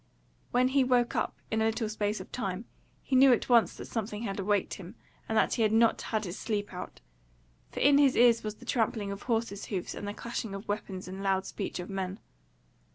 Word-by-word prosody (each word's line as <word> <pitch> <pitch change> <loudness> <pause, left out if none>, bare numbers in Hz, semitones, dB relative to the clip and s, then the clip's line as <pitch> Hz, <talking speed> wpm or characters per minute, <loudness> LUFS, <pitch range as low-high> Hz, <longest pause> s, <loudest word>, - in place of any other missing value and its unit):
When 250 +1 +3
he 270 0 +3
woke 250 -2 +2
up - - -1 0.2
in 220 - +1
a - - +3
little 225 0 0
space 210 0 -1
of - - -10
time, 200 -3 -3 0.4
he 265 - -1
knew 265 +1 +8
at 245 - +2
once 235 -2 +5
that - - -8
something 215 -1 -4
had 200 -3 -3
awaked 200 0 +1
him 190 +3 -9 0.3
and 220 - +1
that - - +3
he - - 0
had 215 -1 +3
not 225 +1 +4
had 220 -2 -2
his 180 +1 -6
sleep 205 -3 -2
out; 180 - -8 0.7
for - - -5
in 285 0 +6
his 275 -3 +5
ears 235 -1 +5
was 215 0 -4
the 245 - -15
trampling 220 -4 0
of 200 0 -6
horse 225 -4 -1
hoofs 190 -4 -3
and 205 - -6
the 205 - -4
clashing 230 -3 -4
of 195 +2 -8
weapons 195 -3 -4
and 190 +1 -6
loud 190 -1 +1
speech - - -4
of 180 - -5
men. 190 -1 -3
215 Hz, 220 wpm, -30 LUFS, 195-235 Hz, 0.7 s, knew